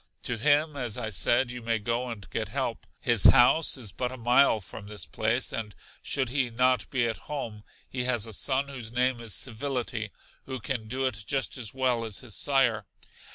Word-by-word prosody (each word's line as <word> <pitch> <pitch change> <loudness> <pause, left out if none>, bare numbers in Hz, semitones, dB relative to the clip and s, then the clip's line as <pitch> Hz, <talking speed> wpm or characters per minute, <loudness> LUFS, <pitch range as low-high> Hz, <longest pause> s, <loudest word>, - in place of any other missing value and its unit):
To 125 - -2
him 150 +4 +3
as 125 -5 -2
I 110 -3 -3
said, 120 +5 +2
you 125 0 -7
may 115 0 0
go 120 +3 -2
and 105 -5 -7
get - - -2
help. - - -3
His 115 -5 +4
house 140 +6 +6
in 125 - -8
but 125 0 -1
a 130 - -7
mile 120 0 +4
from 100 +1 -9
this 105 0 -4
place, 115 +4 0
and 110 -3 -4 0.3
should 130 -3 -1
he 130 -1 0
not 125 0 +1
be 125 -3 +1
at 110 - -2
home, 115 -8 -5 0.2
he 125 -1 -2
has 120 -4 +2
a 110 - -7
son 135 +6 +1
whose 120 -5 -7
name 125 0 +1
is 115 -4 -1
Civility, 120 -3 -3 0.4
who 130 -1 -4
can 120 -6 -3
do 130 +4 -2
it 115 -4 -2
just 135 -2 -1
as 120 -3 -5
well 125 -3 +1
as 110 -3 -3
his 120 -5 -5
sire. 120 -7 +2
120 Hz, 200 wpm, -28 LUFS, 110-130 Hz, 0.4 s, house